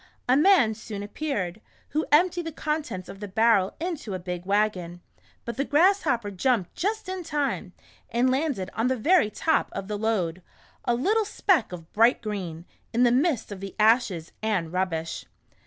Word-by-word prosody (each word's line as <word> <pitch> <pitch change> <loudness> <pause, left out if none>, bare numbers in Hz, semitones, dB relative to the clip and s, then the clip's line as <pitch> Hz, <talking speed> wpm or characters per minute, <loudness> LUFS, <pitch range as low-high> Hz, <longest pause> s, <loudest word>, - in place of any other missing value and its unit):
A 255 - +5
man 295 - +5
soon 210 -2 -7
appeared, 205 - -3 0.3
who 310 +1 -1
emptied 345 +2 +3
the - - -3
contents 300 - -3
of 195 - -10
the 205 - -5
barrel 210 -1 +3
into 320 - -4
a - - -1
big 180 0 -6
wagon, 195 -4 0 0.5
but 235 -1 -5
the 275 - +1
Grasshopper 290 - +2
jumped 200 -2 0
just 425 +2 -2
in 375 -1 -4
time, 295 -4 -2 0.4
and 245 +2 +2
landed 265 -9 -1
on 225 +3 0
the 260 0 +1
very 310 - +4
top 320 +9 +1
of 195 0 -5
the 210 -1 -3
load 185 -6 -1 0.2
— - - -30
a 240 - +2
little 415 - +2
speck 380 - +1
of 170 -2 -10
bright 230 +4 +4
green, 185 -7 -5 0.3
in 240 +2 +2
the 240 - +5
midst 260 -3 +1
of 200 - -6
the 195 0 -7
ashes, 215 -7 +2
and 190 -7 -1
rubbish. 170 -3 -2
225 Hz, 175 wpm, -26 LUFS, 190-300 Hz, 0.5 s, A